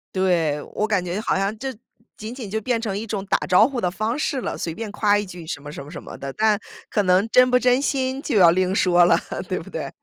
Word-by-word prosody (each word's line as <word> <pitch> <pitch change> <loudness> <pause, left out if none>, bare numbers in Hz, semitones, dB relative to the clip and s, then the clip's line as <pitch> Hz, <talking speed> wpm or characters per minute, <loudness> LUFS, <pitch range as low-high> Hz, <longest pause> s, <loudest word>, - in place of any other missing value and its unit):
对， 170 -6 +1
我 215 - 0
感 200 -4 +1
觉 180 +3 -3
好 220 - 0
像 195 +3 0
这 265 +1 -4 0.4
仅 220 +2 -7
仅 245 -6 -7
就 220 +2 -2
变 240 +1 0
成 210 -4 -3
一 220 - -4
种 200 -3 -4
打 - - +2
招 185 +5 +6
呼 265 -3 -4
的 180 - 0
方 215 +6 -2
式 285 -2 -1
了， - - -4
随 165 - -3
便 220 +5 -6
夸 205 -1 +3
一 205 - -3
句 180 -3 -10
什 155 -2 -5
么 145 - -9
什 - - -7
么 145 - -12
什 170 - -8
么 - - -10
的， 135 0 -6
但 215 +3 +2 0.3
可 210 - +1
能 185 +3 +3
真 250 0 +6
不 250 - +5
真 250 +1 +3
心 265 -1 -1
就 245 -8 -1
要 175 -3 +8
另 185 +2 +1
说 175 -3 +4
了， 170 -1 +4 0.3
对 - - -1
不 - - -11
对？ - - -5
205 Hz, 285 characters per minute, -22 LUFS, 180-230 Hz, 0.4 s, 要